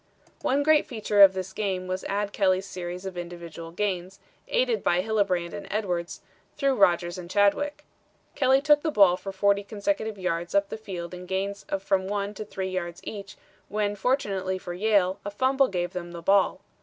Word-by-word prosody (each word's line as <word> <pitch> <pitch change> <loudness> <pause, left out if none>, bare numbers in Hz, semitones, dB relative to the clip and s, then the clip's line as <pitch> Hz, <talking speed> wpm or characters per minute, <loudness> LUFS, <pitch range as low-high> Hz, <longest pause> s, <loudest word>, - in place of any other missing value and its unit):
"One 280 +2 +1
great 310 0 +4
feature 215 -5 +1
of 195 -1 +9
this 190 0 -5
game 190 -3 -2
was 185 +1 -3
Ad 205 +1 -2
Kelly's 190 -1 +2
series 180 0 -6
of 190 -1 -5
individual 170 -1 -8
gains, 185 0 -3 0.3
aided - - +1
by 175 +1 +2
Hillebrand 190 -5 0
and 205 - -7
Edwards, 180 -5 -2 0.4
through 275 -1 +2
Rodgers 175 -5 +2
and 175 -1 -9
Chadwick. 205 +10 +1 0.5
Kelly 265 -1 +3
took 295 0 +5
the 320 - 0
ball 195 - +5
for 195 +1 -7
40 200 +1 +2
consecutive 220 +1 -2
yards 175 -2 -2
up 200 0 +3
the - - -4
field 180 -5 -7
in 180 0 -8
gains 195 +2 -3
of 195 0 -2
from 190 -1 +1
one 205 0 -2
to 215 - -6
three 190 -2 -4
yards 175 -2 -4
each, 200 0 -7 0.3
when 205 0 -1
fortunately 195 -5 0
for 175 -1 -7
Yale, 195 -1 +2
a 205 - -3
fumble 260 +5 +2
gave 175 -4 -2
them 175 -1 -6
the 170 -1 -8
ball. 195 +2 +3
195 Hz, 185 wpm, -26 LUFS, 180-210 Hz, 0.5 s, of